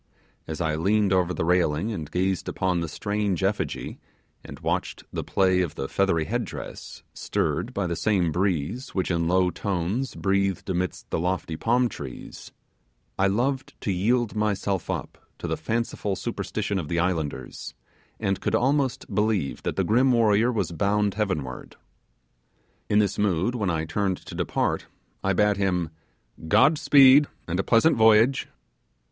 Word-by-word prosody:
As 80 +2 -5
I 80 -2 0
leaned 100 +5 +2
over 90 -1 +2
the 80 - -2
railing 90 +2 +1
and 80 -8 -5
gazed 95 +1 -1
upon 90 -1 0
the 85 - -2
strange 100 +2 -2
effigy 100 +2 -2 0.4
and - - -10
watched - - -2
the - - -3
play 95 -1 +2
of 85 -3 -3
the 65 - -3
feathery 85 -4 +1
head - - -1
dress, - - -8
stirred - - -2
by 100 - -2
the 85 -1 -2
same 90 -1 +1
breeze 95 - -2
which 95 -1 0
in 85 -1 0
low 90 +1 +3
tones 100 +9 -2
breathed 100 -1 0
amidst 90 0 -3
the - - 0
lofty 90 -2 -2
palm 120 +8 +2
trees, 70 - -9 0.7
I 100 - +4
loved 130 +7 -1
to 100 - -1
yield 115 +5 +1
myself 100 -3 -1
up - - -4 0.2
to - - -7
the - - -1
fanciful 115 -3 -2
superstition 100 +1 -3
of 80 - -5
the 85 - -2
islanders, 80 -8 -3 0.4
and 95 -1 -1
could - - 0
almost 135 0 0
believe 105 -9 0
that - - -3
the - - +1
grim 125 +5 +3
warrior 115 0 +3
was 110 -6 -1
bound 100 +4 +1
heavenward. 85 -12 -3 1.1
In 105 - +3
this 100 -2 +2
mood 100 +2 +1
when 105 -6 -1
I 80 -2 -1
turned 95 +1 -1
to - - -12
depart, - - -1 0.4
I 95 - +2
bade 105 +2 +2
him 90 -4 0 0.6
'God 135 - +4
speed, 140 +1 +7 0.2
and 90 +1 -2
a - - +2
pleasant 120 +10 +4
voyage. 110 +4 +5
95 Hz, 160 wpm, -25 LUFS, 85-110 Hz, 1.1 s, speed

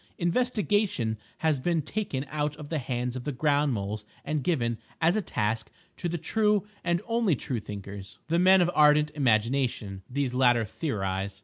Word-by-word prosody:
Investigation 205 - +1 0.2
has 155 -4 +1
been 165 +2 0
taken 145 -8 -3
out 150 0 -1
of 150 -1 -10
the 160 - -1
hands 125 -1 -2
of 130 - -5
the 145 - -2
ground 145 +1 +2
moles 105 -1 -3 0.2
and 150 -2 -1
given, 120 -9 0 0.2
as 170 +3 +3
a 215 - +1
task, 110 - -2 0.3
to 175 - -2
the 175 - -2
true 210 +3 +1 0.2
and 170 +2 0
only 230 -7 +2
true 125 -1 -3
thinkers, 100 -1 -8
the 165 +2 +2
men 190 +1 +6
of 175 0 +2
ardent 150 0 +5
imagination. 115 -6 0
These 135 -1 -1
latter 120 -3 +4
theorize. 95 - -3
145 Hz, 170 wpm, -28 LUFS, 115-170 Hz, 0.3 s, men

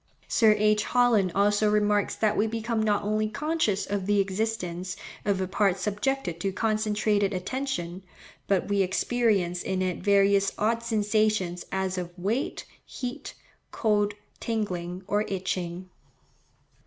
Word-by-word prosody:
Sir 220 -2 +4
H. 210 0 +3
Holland 235 -7 +3
also 205 +1 +3
remarks 210 -1 +2
that 215 -1 +1
we 215 - +2
become 225 0 -2
not 210 -1 +1
only 215 +1 0
conscious 280 -8 0
of 200 -2 -3
the 205 0 +3
existence 190 -3 -2 0.3
of 200 -2 +1
a 190 - -1
part 195 0 +1
subjected 205 -1 -2
to 195 +3 -1
concentrated 210 -1 +1
attention, 185 -3 -3 0.5
but 195 -3 +1
we 200 -1 +2
experience 190 -2 +1
in 185 0 -1
it 180 -1 -2
various 200 -1 +3
odd 230 +2 +1
sensations 215 -5 0
as 190 -1 -1
of 175 0 -7
weight, 210 +9 -2 0.2
heat, 255 +3 -6 0.3
cold, 205 -2 +1 0.2
tingling, 185 -5 -3
or 205 +2 +1
itching. 180 -1 -3
205 Hz, 130 wpm, -27 LUFS, 190-215 Hz, 0.5 s, Sir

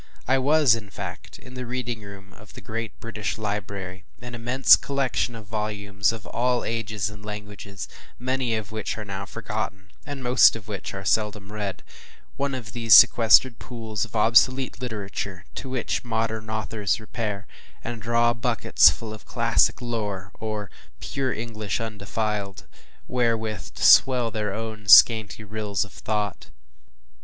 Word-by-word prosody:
I 135 +1 +3
was, 145 -1 +4
in 110 -3 -4
fact, - - -8
in 130 -1 -14
the 125 -1 -6
reading 120 -2 -4
room 100 -1 -12
of 105 -2 -16
the - - -10
great 115 -1 -6
British 110 -3 -4
Library, 100 -3 -5 0.2
an 125 +1 -9
immense 120 +3 +5
collection 135 -3 -1
of 110 -2 -10
volumes 105 -1 -1
of 115 -2 -8
all 125 0 0
ages 110 -3 -2
and 105 -1 -10
languages, 105 -2 -7 0.3
many 130 -1 -1
of 110 -1 -5
which 110 +1 -4
are 105 - -6
now 100 0 -6
forgotten, 105 -3 -5
and 140 -2 -7
most 125 -1 +6
of 110 -3 -9
which 100 -2 -6
are 95 0 -7
seldom 105 0 0
read: 100 -3 -4 0.5
one 140 -1 -2
of 115 -4 -7
these 115 -2 +5
sequestered 115 +3 +6
pools 110 -4 -4
of 115 -1 -7
obsolete 125 +4 +3
literature 100 -5 -5
to 135 - -7
which 130 -2 -2
modern 110 -2 -2
authors 110 -1 -1
repair, 110 -2 -5 0.4
and 115 -1 -5
draw 120 +1 +2
buckets 120 -1 +4
full 110 -2 -6
of 110 - -12
classic - - +2
lore, 105 -6 -4
or 105 -2 -4 0.3
“pure 135 -2 -2
English, 110 -3 -4
undefiled,” 105 -3 -4 0.4
wherewith 115 -3 -1
to - - -5
swell 125 -3 +6
their 105 -2 -2
own 110 0 -6
scanty 110 +1 +7
rills 105 -2 -2
of 100 - -16
thought. 105 -2 -3
110 Hz, 150 wpm, -24 LUFS, 105-120 Hz, 0.5 s, scanty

